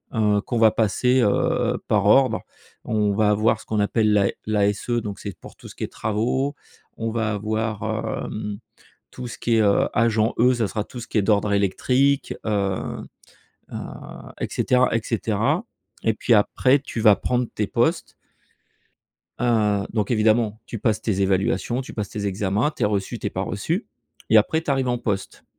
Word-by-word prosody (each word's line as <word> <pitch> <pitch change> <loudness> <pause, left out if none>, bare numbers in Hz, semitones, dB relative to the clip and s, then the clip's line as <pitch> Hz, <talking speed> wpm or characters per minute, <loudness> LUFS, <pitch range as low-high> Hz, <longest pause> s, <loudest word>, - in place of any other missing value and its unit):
heu, 105 -2 +2
qu'on 120 - -3
va 110 -1 +6
passer, 125 +5 +2
heu, 105 -4 +1
par 105 -2 +2
ordre. 130 +5 +4 0.4
On 105 -2 +1
va 105 +1 +2
avoir 110 +1 +2
ce - - -16
qu'on 110 - -1
appelle 105 +1 +2
la 100 -1 +4 0.2
l'ASE 105 0 0
donc 115 -4 -2
c'est 100 -4 -7
pour - - -13
tout - - -13
ce - - -13
qui - - -6
est - - -7
travaux. 120 +7 -1 0.4
On 115 0 -2
va 110 -1 -1
avoir, 110 +1 -2 0.4
hem, 105 -1 -5 0.5
tout 125 - -7
ce 115 - -9
qui 115 -1 +1
est, 110 - +4
heu, 100 -1 +3
agent 115 -1 +2
E, 125 +3 +5
ça 115 -4 0
sera 105 0 -3
tout 125 +1 -9
ce 120 - -9
qui - - -5
est - - +3
d'ordre 105 0 +2
électrique, 125 +8 +1
heu 100 -3 -1 0.7
heu, - - -4 0.6
et - - 0
cetera, 125 -1 +2
et 115 - +2
cetera, 115 - 0 0.4
et 110 - +2
puis, 120 - 0
après 130 +6 +3
tu 120 - -6
vas 105 -2 +6
prendre 125 0 -1
tes 105 - -1
postes. - - 0 1.3
Heu, 105 -4 +2
donc 105 -3 -1
évidemment, 110 -1 +2
tu 115 - -6
passes 110 0 0
tes 100 -4 -1
évaluations, 95 +5 0
tu 130 - -9
passes 105 -3 -4
tes 105 -1 -4
examens, 100 +7 0
tu 155 - -8
es - - +4
reçu, 100 -2 -2
tu - - -5
es - - -1
pas - - -3
reçu - - -2 0.4
et 110 - +6
après 135 +9 +3
tu 160 - -3
arrives 135 -2 +1
en 120 0 0
poste. 100 -4 -4
110 Hz, 190 wpm, -23 LUFS, 105-120 Hz, 1.3 s, va